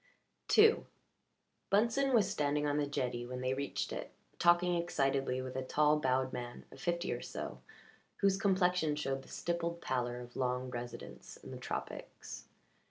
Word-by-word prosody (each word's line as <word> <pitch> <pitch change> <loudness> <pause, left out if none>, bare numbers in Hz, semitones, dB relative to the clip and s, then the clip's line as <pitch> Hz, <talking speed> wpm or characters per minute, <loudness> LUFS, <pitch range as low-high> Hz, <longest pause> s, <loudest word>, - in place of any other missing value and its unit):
II 440 +1 +7 0.8
Bunsen 235 +7 +3
was 220 -6 +5
standing 150 -7 0
on 145 0 +1
the 145 -1 +1
jetty 125 -4 -2
when 125 +1 -5
they 130 0 +1
reached 140 +1 -2
it - - -5 0.3
talking 175 +1 +5
excitedly 135 -6 +1
with 130 0 -6
a 130 - -1
tall 150 +3 +3
bowed 130 -1 +1
man 120 -1 -6
of - - -12
fifty 170 0 0
or - - -4
so - - -5 0.6
whose 195 -1 +3
complexion 180 -6 +2
showed 135 -2 -1
the - - -16
stippled 170 0 -2
pallor 125 -4 -1
of 120 0 -10
long 125 0 -1
residence 120 -1 -7
in - - -11
the - - -6
tropics. - - -6
145 Hz, 160 wpm, -34 LUFS, 130-175 Hz, 0.8 s, II